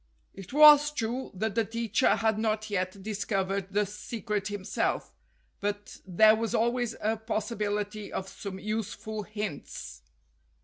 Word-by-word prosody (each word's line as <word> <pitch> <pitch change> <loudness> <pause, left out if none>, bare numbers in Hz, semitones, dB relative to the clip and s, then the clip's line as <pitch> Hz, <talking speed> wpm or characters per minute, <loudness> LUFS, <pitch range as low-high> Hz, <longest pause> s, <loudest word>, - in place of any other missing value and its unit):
It 195 -1 -10
was 295 +1 +8
true 250 -2 -3
that 215 +3 -1
the 230 - +2
teacher 230 +2 +1
had 220 -1 +1
not 215 -1 -1
yet 185 -2 0
discov 200 -1 -2
ered 195 -1 -2
the 205 +1 +2
secret 210 0 -4
himself, 205 -1 -2 0.5
but 205 0 -4
there 215 +4 +6
was 225 -1 -1
always 240 +1 +1
a 220 +1 +1
possi 220 +1 -3
bility 210 0 -2
of 190 - -4
some 195 0 -7
useful 215 +1 -4
hints. 210 - -6
215 Hz, 140 wpm, -29 LUFS, 200-225 Hz, 0.5 s, was